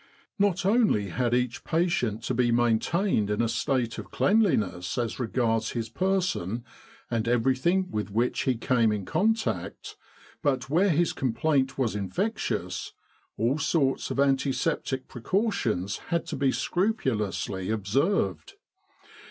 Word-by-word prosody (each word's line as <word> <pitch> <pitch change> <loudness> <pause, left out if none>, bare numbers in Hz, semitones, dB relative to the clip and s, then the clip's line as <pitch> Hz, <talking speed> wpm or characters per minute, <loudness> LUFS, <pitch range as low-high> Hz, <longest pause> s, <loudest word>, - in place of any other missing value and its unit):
Not 195 -3 +2
only 200 - +3
had 120 +5 0
each 125 -1 -1
patient 160 - 0
to 130 - -1
be 120 0 +2
maintained 120 - +2
in 105 +1 -1
a 120 - +2
state 120 +1 -1
of - - -8
cleanliness 110 - +1
as 120 0 -2
regards 115 -2 0
his 115 -2 -3
per 190 +9 +1
son 115 - -3 0.5
and 115 -1 0
everything 130 +10 +2
with 105 -1 -2
which 115 +5 0
he 130 - +2
came 115 -1 +2
in 105 -3 -2
contact, 220 - -1 0.5
but 135 -4 0
where 185 +6 +4
his 170 0 +2
complaint 130 +2 0
was 120 -6 0
infectious, 100 - -2 0.4
all 125 +7 +1
sorts 145 -2 +1
of - - -3
anti 135 0 +3
septic 135 -3 -2
precautions 120 - -1
had 170 -1 0
to - - -5
be 135 -1 +2
scrupulously 110 - -1
observed. 105 - 0
125 Hz, 135 wpm, -27 LUFS, 110-170 Hz, 0.5 s, where